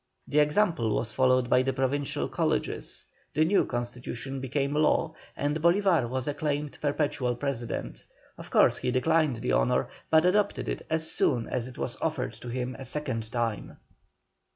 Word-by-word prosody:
The 150 - +2
example 150 - +2
was 115 - -2
followed 130 -1 +3
by 125 - +4
the 135 +1 0
Provincial 135 +2 -1
Colleges, - - -2 0.3
the 155 +2 +4
new 195 +5 +3
Constitution 120 +2 -4
became 140 +2 -1
law, 155 +1 +2 0.2
and 145 +2 -1
Bolívar 170 - +3
was 130 +1 -3
acclaimed 145 0 -2
perpetual 145 -4 0
President. 120 -3 -4 0.3
Of - - -10
course - - +5
he - - -1
declined 155 +2 +2
the 115 - -2
honour, - - +2 0.2
but 160 +1 +5
accepted 205 +3 +2
it - - -3
as 160 0 0
soon 120 -4 +1
as 125 -1 -2
it 130 +1 -11
was 120 - -3
offered 155 -5 -1
to - - -11
him 125 +1 -3
a - - -6
second 125 -6 -3
time. 115 -3 -2
135 Hz, 160 wpm, -28 LUFS, 125-155 Hz, 0.3 s, course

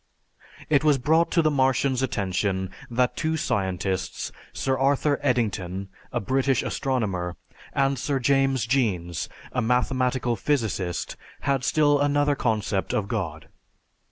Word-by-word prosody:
It 145 -2 +3
was 150 -2 +4
brought 160 +6 +3
to 170 - +2
the 155 - +3
Martian's 130 -1 +2
attention 95 -5 -1 0.2
that 125 +1 +1
two 160 0 0
scientists, 95 - -2 0.2
Sir 135 -1 0
Arthur 140 +2 +2
Eddington, 100 -8 -1 0.2
a 120 - 0
British 130 +4 +1
astronomer, 100 -10 -1 0.4
and 135 -1 +1
Sir 140 -2 0
James 135 -1 +2
Jeans, 95 - 0 0.2
a 125 - 0
mathematical 125 0 +1
physicist, 105 - -1 0.2
had 135 -2 0
still 145 0 +3
another 145 0 +2
concept 110 -6 -1
of 100 -2 0
God. 85 -8 -3
125 Hz, 125 wpm, -25 LUFS, 100-140 Hz, 0.4 s, was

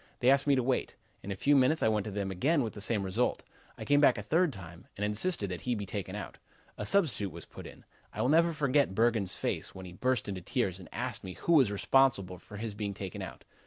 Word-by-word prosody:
They 125 +2 +5
asked 140 +1 +3
me 140 - +5
to 130 - +1
wait. 130 +1 -1 0.3
In 100 - -6
a - - -2
few 145 +9 +3
minutes 135 +4 +3
I - - +4
went 105 -2 +1
to - - -4
them 100 -1 -3
again, 140 - +1
with 110 - -4
the 105 - -8
same 105 -1 +2
result. 100 +6 0 0.3
I - - -7
came 145 0 +4
back 135 -4 +5
a 105 - -5
third 165 - +2
time, 90 -6 -11
and 105 - -1
insisted 105 - 0
that 90 - -5
he 125 -1 -1
be 105 -2 -4
taken 100 -2 -5
out. - - -7 0.4
A - - -5
substitute 155 - +1
was 85 +1 -10
put - - -11
in. - - -14 0.3
I - - -2
will 125 - +2
never 165 +3 +4
forget 140 - +1
Bergen's 110 -4 +3
face - - -3
when 95 0 -8
he 90 - -10
burst 125 +3 0
into 95 -2 -4
tears 95 -1 -1
and 90 - -12
asked 120 -4 -4
me 95 -1 -6
who 170 - 0
was 135 -10 +5
responsible 100 -4 +2
for 105 - -11
his 110 0 -4
being 100 -1 -4
taken 95 -2 -6
out. - - -8
110 Hz, 255 wpm, -30 LUFS, 95-135 Hz, 0.4 s, They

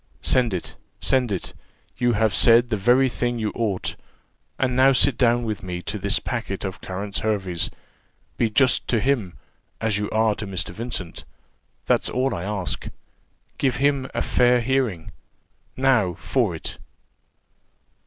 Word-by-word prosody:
"Send 125 -3 +3
it 90 - -6 0.2
send 130 -4 +1
it 95 - -4 0.4
you 120 -1 +1
have 110 -1 +1
said 120 +1 +6
the 110 - +1
very 125 +6 +3
thing 120 -1 -2
you 110 -2 -2
ought; 105 -5 -2 0.6
and 125 -1 0
now 135 +1 +5
sit 125 - +4
down 120 -1 +2
with 110 -3 -3
me 90 -1 -5
to 105 - -4
this 100 +2 +1
packet 115 -6 -4
of 95 -1 -6
Clarence 100 +2 -4
Hervey's 95 -6 -1 0.7
be 115 - +1
just 130 +4 +3
to 115 - +1
him, 115 -8 -1 0.4
as 110 -2 0
you 105 - -2
are 110 0 +2
to 105 - -5
Mr. 95 -2 -2
Vincent, 105 -4 -6 0.6
that's - - +2
all 130 0 0
I 85 - -4
ask 100 -3 -3 0.7
give 130 -3 +1
him 140 0 +1
a - - 0
fair 125 0 +3
hearing: 115 -9 -1 0.7
now 125 -10 +2
for 115 -10 -1
it." 80 - -7
115 Hz, 155 wpm, -23 LUFS, 100-125 Hz, 0.7 s, said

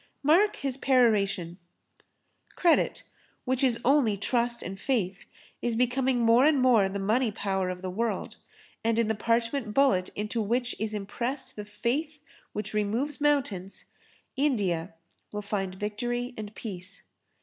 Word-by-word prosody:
Mark 360 +9 +4
his 270 -2 -3
peroration: 200 -10 +2 1.0
"Credit, 345 -2 +2 0.4
which 260 +1 0
is 245 -3 +3
only 255 -6 +4
Trust 235 +3 0
and 195 +2 -6
Faith, 200 -6 -1 0.4
is 240 -1 0
becoming 250 +1 +1
more 230 +2 +5
and 295 -1 +4
more 235 -6 +4
the 200 - -4
money 220 +4 +1
power 190 -2 -1
of 180 0 -6
the 185 - -2
world, 230 +4 -2 0.5
and 225 0 +1
in 230 -1 +2
the - - +2
parchment 230 +1 0
bullet 200 -10 +3
into 210 +3 -2
which 240 +4 0
is 215 0 -2
impressed 250 +6 -3
the 210 - -6
faith 260 +9 -2 0.3
which 210 0 -5
removes 230 +8 -1
mountains, 245 -11 0 0.5
India 195 - 0 0.4
will 210 0 -4
find 195 -2 -2
victory 240 +5 -3
and 215 -1 -7
peace." 195 -2 -7
230 Hz, 140 wpm, -28 LUFS, 200-255 Hz, 1.0 s, more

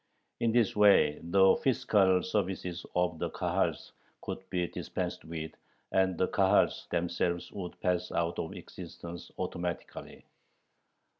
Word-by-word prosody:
In 115 - +2
this 115 -3 +2
way 100 -8 +5
the 95 +3 +5
fiscal 95 -7 +3
services 90 -3 -2
of 90 -2 +1
the - - -1
Kahals - - -1 0.3
could - - -4
be 90 -2 0
dispensed - - -4
with, 80 -1 -5 0.4
and 95 -2 +2
the 95 - +2
Kahals 95 -1 +2
themselves 85 0 -1
would 90 -3 -7
pass 90 -1 0
out 85 0 -1
of - - -3
existence 85 0 -9
automatically. 85 0 -5
90 Hz, 125 wpm, -30 LUFS, 85-95 Hz, 0.4 s, way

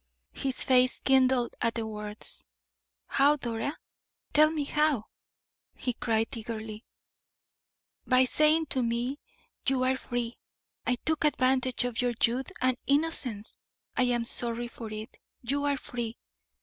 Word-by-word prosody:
His 265 -1 -2
face 255 -1 +4
kindled 260 -2 +3
at 230 - +1
the 230 -1 -2
words. 210 -1 -6 0.6
"How, 285 +2 +4
Dora? 240 +1 -3 0.6
Tell 305 +1 +7
me 310 -2 -1
how!" 295 -5 +1 0.7
he 250 - -2
cried, 225 -1 0
eagerly. 220 -1 -6 1.2
"By 255 0 +6
saying 305 +5 +4
to 260 - +1
me: 240 +4 -1 0.5
'You 260 -1 +3
are 260 +1 +3
free. 240 -2 -3 0.5
I 250 - +3
took 315 +5 -1
advantage 255 -4 +2
of 245 -1 -1
your 245 -1 +1
youth 245 +3 +1
and 255 -1 +2
innocence; 275 -7 0 0.4
I 255 - +3
am 240 -1 +1
sorry 235 0 -2
for 225 -2 -8
it. 215 +1 -7 0.2
You 280 +4 0
are 285 -1 +2
free! 235 -3 -5
250 Hz, 135 wpm, -29 LUFS, 230-270 Hz, 1.2 s, Tell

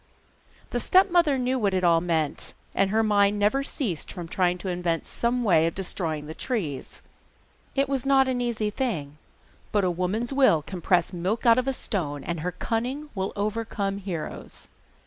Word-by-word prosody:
The - - 0
stepmother 350 -6 +4
knew 255 +1 0
what 200 -4 +1
it 185 - 0
all 170 -1 +5
meant, 160 -4 -1 0.2
and 195 0 +2
her 220 +2 +2
mind 205 -1 +3
never 210 +7 +2
ceased 220 - -3
from 175 -3 -7
trying 180 0 +1
to 185 - -7
invent 175 -2 -1
some 240 +1 -1
way 165 -6 +4
of 165 - -3
destroying 165 -5 -3
the 155 - -6
trees. 165 - -4 0.7
It 275 0 +2
was 270 -2 -1
not 270 -1 +4
an 250 -1 0
easy 225 -3 -1
thing, 160 - -3 0.5
but 205 -2 +2
a 180 - +2
woman's 195 +8 -2
will 260 - +4
can 180 +2 -7
press 180 +1 +2
milk 185 +7 -2
out 230 +1 +6
of 255 - -2
a - - +3
stone, 145 - -3
and 170 -1 -3
her 180 +3 -2
cunning 250 - -3
will 190 -1 -2
overcome 205 -1 -2
heroes. 180 -5 -6
200 Hz, 180 wpm, -26 LUFS, 175-245 Hz, 0.7 s, out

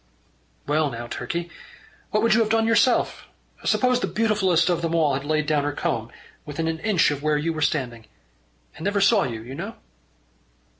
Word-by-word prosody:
"Well 150 0 +1
now, 120 -2 -6
Turkey, 170 +9 -4 0.6
what 210 +1 +1
would 230 -1 +4
you 225 - +4
have 220 -2 +2
done 225 0 +2
yourself, 230 +2 +2 0.4
suppose 250 -1 +2
the - - -1
beautifulest 190 -7 +2
of 175 -2 +1
them 165 0 -1
all 155 -4 +3
had 135 +1 -2
laid 150 0 0
her 145 -1 +1
comb - - -2
down - - -20 0.3
within 155 +2 -4
an 160 0 -2
inch 185 -5 +2
of 145 -1 -4
where 150 0 +1
you 165 +3 -1
were 155 - -5
standing 125 -7 -1 0.7
and 160 - -10
never 205 +2 +1
saw 200 +1 +4
you, 115 -4 -5
you 125 +3 -9
know?" - - -6
165 Hz, 190 wpm, -24 LUFS, 145-210 Hz, 0.7 s, would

